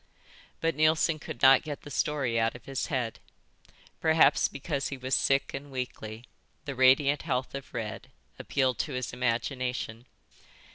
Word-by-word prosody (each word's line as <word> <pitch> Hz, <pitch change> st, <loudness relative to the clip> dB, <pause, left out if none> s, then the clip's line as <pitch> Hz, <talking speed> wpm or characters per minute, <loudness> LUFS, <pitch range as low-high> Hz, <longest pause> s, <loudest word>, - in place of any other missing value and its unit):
But 165 Hz, -2 st, +1 dB
Neilson 155 Hz, +1 st, +3 dB
could 120 Hz, -, -8 dB
not 135 Hz, 0 st, +8 dB
get 150 Hz, -3 st, -7 dB
the 145 Hz, -, -10 dB
story 135 Hz, -7 st, 0 dB
out 115 Hz, +1 st, +1 dB
of 125 Hz, -, -12 dB
his 135 Hz, -1 st, -3 dB
head. 125 Hz, -6 st, -2 dB, 0.8 s
Perhaps 160 Hz, 0 st, +4 dB
because 140 Hz, 0 st, -3 dB
he 135 Hz, -, -5 dB
was 130 Hz, +1 st, -4 dB
sick 135 Hz, 0 st, +2 dB
and 140 Hz, +1 st, -6 dB
weakly, 120 Hz, -3 st, -6 dB, 0.4 s
the 140 Hz, -, -4 dB
radiant 135 Hz, +3 st, +4 dB
health 130 Hz, -5 st, -2 dB
of 140 Hz, -1 st, -7 dB
Red 115 Hz, -3 st, -5 dB, 0.3 s
appealed 130 Hz, -2 st, 0 dB
to 150 Hz, -, -2 dB
his 125 Hz, -2 st, -3 dB
imagination. 125 Hz, -1 st, -2 dB
130 Hz, 150 wpm, -29 LUFS, 125-145 Hz, 0.8 s, not